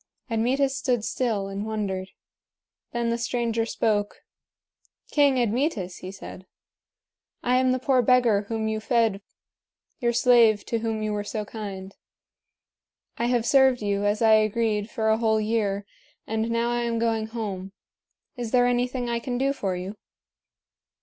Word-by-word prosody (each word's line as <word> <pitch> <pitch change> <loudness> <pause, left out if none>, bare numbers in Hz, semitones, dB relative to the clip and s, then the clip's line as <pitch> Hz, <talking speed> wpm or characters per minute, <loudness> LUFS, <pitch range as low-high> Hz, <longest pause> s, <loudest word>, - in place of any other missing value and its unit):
Admetus 265 +5 +1
stood 255 -5 0
still 220 -6 -1
and 195 +1 -4
wondered. 200 -4 -3 0.8
Then 235 -1 -1
the 235 - -1
stranger 230 -1 -1
spoke: 205 -3 -1 0.9
"King 285 -3 +4
Admetus," 230 - -1
he 185 - -8
said, 190 -1 -10 1.0
"I 250 +1 +3
am 255 0 +3
the 255 - +2
poor 260 0 +2
beggar 235 -4 +3
whom 220 -1 -2
you 220 0 -1
fed 225 -3 +1 0.8
your 240 -1 +1
slave 235 -3 +4
to 230 - -1
whom 220 -1 -2
you 215 0 -1
were 205 0 -2
so 210 0 -4
kind. 195 -3 -7 1.2
I 235 - +1
have 240 -2 +1
served 265 -2 +4
you, 200 0 0
as 205 +2 +1
I 220 -1 +6
agreed, 215 0 +1
for 220 -3 -1
a 220 +1 +3
whole 220 -1 +2
year, 210 -2 -1 0.4
and 220 +1 -2
now 230 +1 0
I 240 0 0
am 235 -1 -1
going 225 -1 0
home. 200 -4 -5 0.6
Is 240 -3 -4
there 245 +1 +4
anything 245 0 0
I 235 0 -1
can 245 +1 -3
do 275 +2 +1
for 195 -8 -2
you?" 185 +4 -6
225 Hz, 155 wpm, -25 LUFS, 210-245 Hz, 1.2 s, I